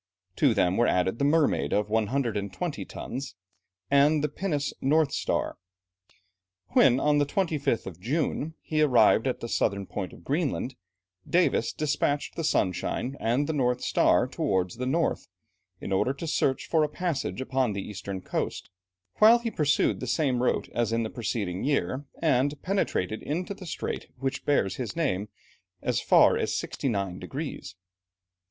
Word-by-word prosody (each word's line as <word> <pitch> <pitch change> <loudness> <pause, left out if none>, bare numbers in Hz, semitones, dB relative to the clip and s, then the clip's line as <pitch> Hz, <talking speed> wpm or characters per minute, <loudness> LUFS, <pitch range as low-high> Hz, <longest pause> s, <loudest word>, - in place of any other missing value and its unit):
To - - +3
them 90 +1 +2
were 120 - +4
added 95 +4 +1
the 140 - +2
Mermaid 155 +1 +2
of 105 0 +1
120 110 -3 -1
tons, 130 -8 -6 0.6
and 145 +2 +4
the 150 - +1
pinnace 150 -3 -2
North 150 +1 +3
Star. - - -1 1.1
When, 125 +6 +5
on 150 0 +3
the 145 - +3
25th 150 - 0
of 90 -3 -8
June, 150 - -2
he 155 -1 0
arrived 125 -4 +5
at 130 - -2
the 115 - -4
southern 100 -3 0
point 95 -1 -5
of - - -14
Greenland, 140 - -1 0.6
Davis 170 -9 +2
despatched 145 -1 -1
the 165 - -4
Sunshine 125 - 0
and 120 +6 +1
the 160 - -2
North 125 -3 +1
Star - - +3
towards 95 0 -1
the 125 +1 -3
north, 165 +5 0 0.5
in - - -6
order 95 +7 +2
to 155 - -6
search 140 -4 0
for 160 - +2
a 150 - 0
passage 165 -4 -2
upon 130 -3 0
the 100 -1 -5
eastern 100 -2 -6
coast, - - -4 0.5
whilst 230 +2 +7
he 230 - -1
pursued 145 -5 +1
the 125 - -5
same 125 -1 +1
route 125 - +1
as 120 -1 0
in 115 0 +1
the 110 - -4
preceding 100 -6 -3
year, 140 0 0 0.2
and 145 -1 +2
penetrated 110 - -1
into 175 +6 -3
the 190 -2 -10
strait - - -4
which 135 +1 -3
bears 95 -10 +1
his 125 +4 -4
name 105 - -1 0.5
as - - 0
far - - +5
as - - -1
69 100 -7 -2
degrees. 135 - -6
130 Hz, 160 wpm, -27 LUFS, 105-150 Hz, 1.1 s, whilst